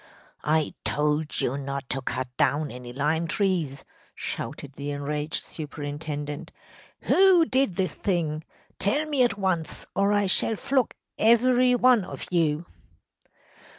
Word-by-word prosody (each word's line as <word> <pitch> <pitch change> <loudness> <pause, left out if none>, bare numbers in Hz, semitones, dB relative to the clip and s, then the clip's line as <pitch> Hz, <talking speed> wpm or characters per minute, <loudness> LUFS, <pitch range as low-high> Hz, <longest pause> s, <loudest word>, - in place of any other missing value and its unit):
“I 155 0 +1
told 150 +1 0
you 135 +3 -1
not 140 -1 -4
to 135 - 0
cut 130 0 -3
down 145 +3 +1
any 125 0 -8
lime 150 +5 0
trees!‚ÄĚ 170 -9 0 0.3
shouted 140 -1 -5
the 140 +1 -5
enraged 150 +2 -2
superintendent. 145 -1 -5 0.5
“Who 375 -3 +5
did 260 - +1
this 185 -3 -1
thing? 160 -5 -1 0.4
Tell 285 +11 +1
me 290 -4 0
at 240 -4 +3
once, 185 -5 -1
or 200 +1 +3
I 205 -1 +3
shall 195 +3 +3
flog 260 +3 0 0.2
every 250 +2 +5
one 245 -3 +5
of - - -7
you! 165 -2 +1
160 Hz, 130 wpm, -26 LUFS, 145-215 Hz, 0.5 s, Who